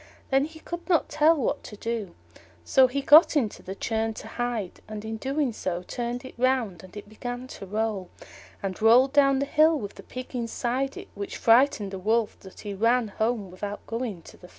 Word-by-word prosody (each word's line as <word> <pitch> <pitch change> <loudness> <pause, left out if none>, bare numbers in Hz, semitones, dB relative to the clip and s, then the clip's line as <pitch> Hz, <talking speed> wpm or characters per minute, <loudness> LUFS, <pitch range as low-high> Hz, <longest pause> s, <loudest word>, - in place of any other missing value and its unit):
Then 270 +1 +4
he 315 +1 -11
could 345 +3 -7
not 340 -3 +3
tell 310 +2 +4
what 270 - -1
to 210 - -9
do. 225 -5 -4 0.5
So 265 -1 +5
he 275 +2 -3
got 305 +2 +7
into 225 -7 -1
the 190 - -7
churn 225 +1 -1
to - - -8
hide, 235 -6 -3
and 215 0 -7
in 220 0 -4
doing 270 +1 -1
so 180 -4 -3
turned 240 +5 -4
it - - -9
round, 245 -9 +1
and 185 +2 -13
it 205 - -9
began 245 +3 -6
to 195 - -9
roll, 210 -2 -2 0.5
and 195 +1 -4
rolled 250 +5 +6
down 275 -2 +5
the 280 - 0
hill 310 +2 +4
with 205 -6 -6
the - - -11
Pig 255 +1 -8
inside 245 +3 -2
it, - - -9
which 200 0 -6
frightened 230 -4 +4
the 190 - -5
Wolf 220 +3 +1
so - - -13
much 190 - -13
that - - -15
he 205 -1 -5
ran 230 +3 +2
home 220 -2 -1
without 205 +3 -6
going 230 -7 -4
to - - -14
the 180 - -14
Fair. - - -22
230 Hz, 220 wpm, -26 LUFS, 205-265 Hz, 0.5 s, got